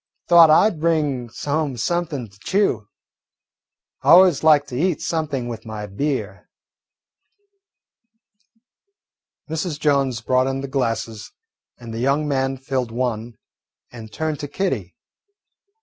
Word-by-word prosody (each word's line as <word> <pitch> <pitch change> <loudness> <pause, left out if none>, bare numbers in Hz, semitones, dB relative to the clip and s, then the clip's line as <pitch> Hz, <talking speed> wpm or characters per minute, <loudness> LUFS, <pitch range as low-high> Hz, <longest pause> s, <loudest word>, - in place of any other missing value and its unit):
"Thought 170 -2 +8
I 155 +7 +6
'd 165 - -11
bring 150 -7 0
home 145 -3 -1
something 155 -2 -2
to 95 -1 -22
chew. 155 - 0 1.1
I - - -1
always 180 -4 +6
like 150 -2 +5
to 125 - -6
eat 165 +3 0
something 150 -7 -2
with 115 -2 -6
my 110 -1 -6
beer." 105 -2 -4 3.0
Mrs. 160 -1 -3
Jones 140 -5 +1
brought 130 +2 +1
in 135 0 -2
the 140 - -5
glasses, 115 -5 -3 0.5
and 115 -2 -9
the 115 - -4
young 140 +4 +1
man 135 -1 -1
filled 130 -2 -3
one 115 -1 -3 0.6
and 110 -3 -10
turned 155 -2 -3
to 145 - -5
Kitty. 125 - -3
135 Hz, 125 wpm, -21 LUFS, 115-155 Hz, 3.0 s, Thought